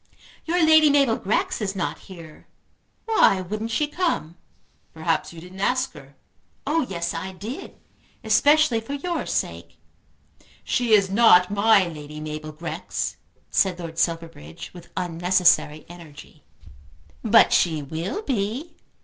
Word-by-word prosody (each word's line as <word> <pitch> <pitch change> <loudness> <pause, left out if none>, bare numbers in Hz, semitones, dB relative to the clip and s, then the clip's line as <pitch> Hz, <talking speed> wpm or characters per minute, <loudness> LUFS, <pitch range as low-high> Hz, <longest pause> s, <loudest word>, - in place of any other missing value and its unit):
Your 340 0 +2
Lady 315 -1 +6
Mabel 275 -5 +3
Grex 210 +2 -1
is 200 -1 -2
not 185 - -3
here. 165 -4 -13 0.6
Why 440 - +4
wouldn't 210 +5 -4
she 265 +7 0
come?" 295 - -2 0.6
"Perhaps 160 +1 -1
you 170 - -11
didn't 180 +3 -12
ask 255 +6 0
her." 135 +1 -15 0.5
"Oh 300 -1 0
yes 170 -2 -3
I 190 +3 -5
did; 215 +8 -8 0.5
especially 260 +2 +3
for 225 +5 -7
your 340 +5 -3
sake." - - -4 0.9
"She 240 -3 0
is 195 -2 +2
not 195 -4 +5
my 205 -2 +4
Lady 150 -2 -9
Mabel 155 0 -6
Grex," 165 +2 -5 0.3
said 190 -3 +2
Lord 165 -2 -7
Silverbridge 165 -1 -4
with 175 -2 -13
unnecessary 175 -3 +2
energy. 155 -3 -14 0.8
"But 225 0 +5
she 160 -4 +2
will 165 - -4
be." 250 - -3
190 Hz, 130 wpm, -23 LUFS, 165-240 Hz, 0.9 s, Lady